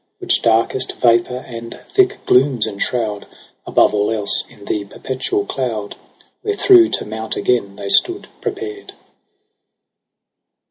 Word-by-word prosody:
Which - - 0
darkest 115 +3 +1
vapour 120 +1 +2
and 115 -1 -8
thick 390 +1 +1
glooms 125 -3 +3
enshroud 105 0 -3 0.4
Above - - +3
all 105 0 +1
else 105 -3 -1
in 100 - -16
the 105 - -2
perpetual 135 - -3
cloud, 115 -6 -3 0.5
Wherethro' 385 -4 +5
to - - -1
mount 110 +1 -4
again 100 -6 0
they 100 - -6
stood 360 - +3
prepared. 420 -1 -5
120 Hz, 120 wpm, -18 LUFS, -, 0.5 s, Wherethro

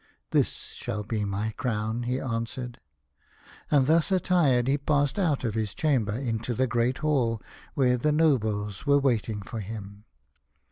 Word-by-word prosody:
" - - -50
This - - +3 0.2
shall 110 -3 -4
be 105 0 -2
my 100 +2 -2
crown," 110 -1 -1
he 130 +1 0
answered. 120 0 -4 0.9
And 140 -3 +4
thus 160 +5 +3
attired 165 -10 +3
he 140 +2 +2
passed 145 +3 +1
out 160 -9 +1
of 115 -4 -1
his 110 -3 -2
chamber 130 -9 +1
into 120 -1 -2
the 130 - +2
Great 125 +1 +1
Hall, 130 -7 +1 0.4
where 125 -2 +3
the 150 +5 +1
nobles 110 - +1
were 140 0 +6
waiting 115 -6 0
for 115 +2 -6
him. 105 0 -8
120 Hz, 155 wpm, -27 LUFS, 110-140 Hz, 0.9 s, were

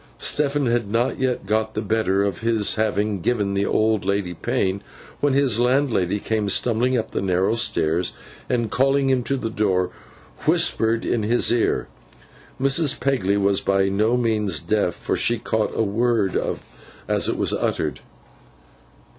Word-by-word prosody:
Stephen 145 -1 0
had 120 -3 0
not 115 +4 0
yet 130 -5 -1
got 110 +2 -1
the 110 - -1
better 100 -2 +1
of 100 -3 -2
his 110 -2 +1
having 105 -2 -1
given 105 -2 0
the 100 0 0
old 110 -1 +1
lady 100 -2 -1
pain, 95 +3 -1 0.4
when 145 -2 +1
his 135 -5 +2
landlady 120 -7 +1
came 105 -1 -1
stumbling 120 +4 +1
up 110 -1 -3
the - - -2
narrow 95 +2 +1
stairs, 85 -7 0 0.4
and 120 -3 -1
calling 135 +1 +2
him 130 -1 +2
to 135 +3 -1
the 115 -3 -4
door, 95 -4 0 0.6
whispered 115 +1 +2
in 120 - 0
his 115 +3 +2
ear. 120 -1 +1 0.7
Mrs. 135 +2 +2
Pegler 120 -7 +1
was 100 0 +2
by 95 0 +1
no 110 +5 +1
means 105 -8 0
deaf, 105 -5 0
for - - -2
she 120 - +1
caught 110 -1 -1
a - - +1
word 110 -1 0 0.7
as - - +1
it - - -1
was - - +1
uttered. 75 -4 -2
110 Hz, 155 wpm, -22 LUFS, 100-120 Hz, 0.7 s, his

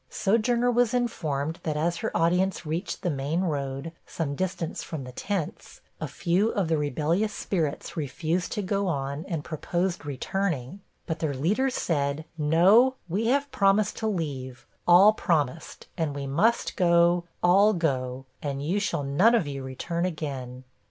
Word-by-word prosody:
Sojourner 235 +4 +2
was 245 0 +2
informed 160 - -1
that 155 -2 -2
as 170 +2 0
her - - -2
audience 180 +2 +1
reached 165 +5 -3
the 175 - +1
main 145 +5 -1
road, 140 -3 -2 0.2
some 155 -4 -3
distance 170 0 -3
from 155 -5 -6
the 125 - -8
tents, 190 +4 -4 0.2
a - - -3
few 185 +6 +1
of 190 -7 -1
the 160 - +2
rebellious 155 - 0
spirits 160 -8 -2
refused 160 +4 -2
to 210 - -2
go 200 +1 0
on, 140 -2 -2
and 165 -5 -3
proposed 175 +2 -2
returning; 145 +2 -3 0.3
but 160 -1 -3
their 150 -4 -1
leaders 215 - +1
said, 145 -1 -1
'No 180 - +5
we 200 +6 -1
have 280 +3 +1
promised 200 +1 +3
to 220 - -1
leave 135 -10 -4 0.2
all 185 +5 +8
promised, 160 -6 -1
and 155 -3 -1
we 140 -1 -4
must 170 +13 +1
go, 170 -1 +4 0.2
all 195 +4 +6
go, 135 -6 -1 0.2
and 140 -1 -3
you 185 +6 +1
shall 195 -7 -1
none 180 +13 +4
of 220 - +2
you 140 -1 -5
return 135 +6 -3
again.' 135 -7 -4
165 Hz, 160 wpm, -26 LUFS, 145-195 Hz, 0.3 s, all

